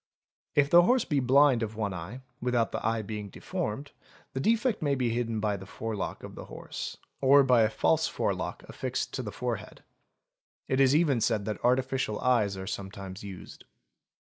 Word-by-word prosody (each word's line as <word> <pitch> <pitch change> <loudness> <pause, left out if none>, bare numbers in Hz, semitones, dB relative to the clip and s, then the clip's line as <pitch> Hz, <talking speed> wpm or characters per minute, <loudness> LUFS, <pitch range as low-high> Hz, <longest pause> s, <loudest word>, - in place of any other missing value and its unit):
If 145 0 +3
the 175 - +9
horse 245 +7 +3
be 145 - +1
blind 135 -1 +5
of 110 -1 -3
one 105 -3 -2
eye, 95 +9 -7 0.2
without 120 -2 +1
the - - -4
eye 115 0 0
being 105 -1 -5
deformed, 120 +9 -4 0.4
the 130 - -2
defect 230 - +1
may 145 -2 +1
be 125 -3 0
hidden 115 -1 -1
by 105 -1 0
the 95 0 -10
forelock 110 0 -4
of - - -8
the - - -8
horse, - - -7 0.2
or 140 +1 +7
by 125 -3 +5
a 110 - +4
false 110 - +2
forelock - - -2
| - - -23
affixed - - -3
to - - -2
the - - -5
forehead. - - -5 0.8
It 130 - +1
is 135 +1 +5
even 150 -7 +3
said 110 -2 +1
that 105 -2 -4
artificial 125 -2 +1
eyes 110 -6 +2
are 95 - -5
sometimes 95 -1 -6
used. 95 -3 -10
115 Hz, 185 wpm, -29 LUFS, 105-135 Hz, 0.8 s, the